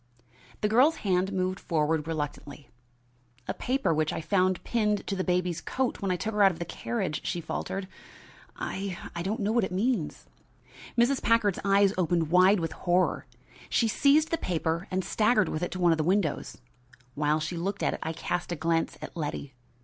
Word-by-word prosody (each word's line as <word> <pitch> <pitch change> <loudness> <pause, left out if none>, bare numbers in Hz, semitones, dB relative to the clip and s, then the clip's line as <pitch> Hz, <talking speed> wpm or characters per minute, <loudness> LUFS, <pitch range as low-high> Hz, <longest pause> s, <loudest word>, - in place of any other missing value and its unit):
The 210 - +2
girl's 255 +9 +4
hand 185 0 +2
moved 185 -1 -1
forward 155 -1 0
reluctantly. 150 -2 -5 0.8
"A - - -1
paper 260 -8 0
which 155 0 +1
I - - -3
found 185 +1 +1
pinned 210 -3 0
to 200 - -2
the 190 - -1
baby's 180 -2 0
coat 260 -1 -2
when 195 - -1
I 180 - +2
took 220 +5 -3
her 210 - +1
out 195 - +8
of 170 - -8
the 170 - -4
carriage," 120 +3 -3
she 175 - -2
faltered. 190 +3 -4 0.7
"I 195 -2 -4 0.2
I 170 - -3
don't 210 +6 -2
know 205 +1 +1
what 235 -1 +2
it 190 - -2
means." 200 -2 -1 0.7
Mrs. 245 +3 +3
Packard's 220 -4 +2
eyes 200 0 +4
opened 170 -2 +1
wide 185 +3 +6
with 165 -1 -2
horror. 180 +1 0 0.4
She 230 - +2
seized 290 +7 +3
the 330 - 0
paper 165 0 -1
and 190 0 -1
staggered 215 -4 +2
with 155 - -3
it 175 - -1
to 185 - -5
one 175 -1 +4
of 160 - +1
the - - +2
windows. 180 -2 0 0.6
While 150 +2 +1
she 155 +3 -3
looked 190 +4 -3
at - - +1
it, - - -5
I 160 - -2
cast 175 +2 -3
a - - 0
glance 165 +1 0
at - - -8
Letty. 145 -3 -4
185 Hz, 195 wpm, -28 LUFS, 165-205 Hz, 0.8 s, out